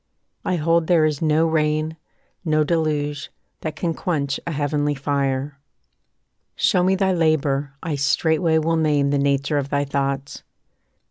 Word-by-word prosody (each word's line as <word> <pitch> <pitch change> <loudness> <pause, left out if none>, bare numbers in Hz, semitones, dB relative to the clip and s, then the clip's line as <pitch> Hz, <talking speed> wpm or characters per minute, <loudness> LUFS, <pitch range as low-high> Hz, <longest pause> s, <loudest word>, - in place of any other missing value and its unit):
I 180 - 0
hold 165 0 +1
there 170 -3 +4
is 150 -2 -1
no 155 0 +3
rain, 155 0 0 0.5
No 155 -3 +2
deluge, 150 -3 -1 0.3
that 155 -1 -5
can 170 -2 -1
quench 145 -7 -2
a - - -1
heavenly 145 0 0
fire. 140 0 -2 1.0
Show 180 - +2
me 190 +1 +3
thy 190 0 +1
labour, 145 -4 0
I 165 - -2
straightway 160 +4 +2
will 165 +1 +1
name 145 -3 +2
The 145 - +1
nature 140 +1 +1
of 140 0 -4
thy 145 0 0
thoughts. 140 0 -3
150 Hz, 145 wpm, -22 LUFS, 140-160 Hz, 1.0 s, there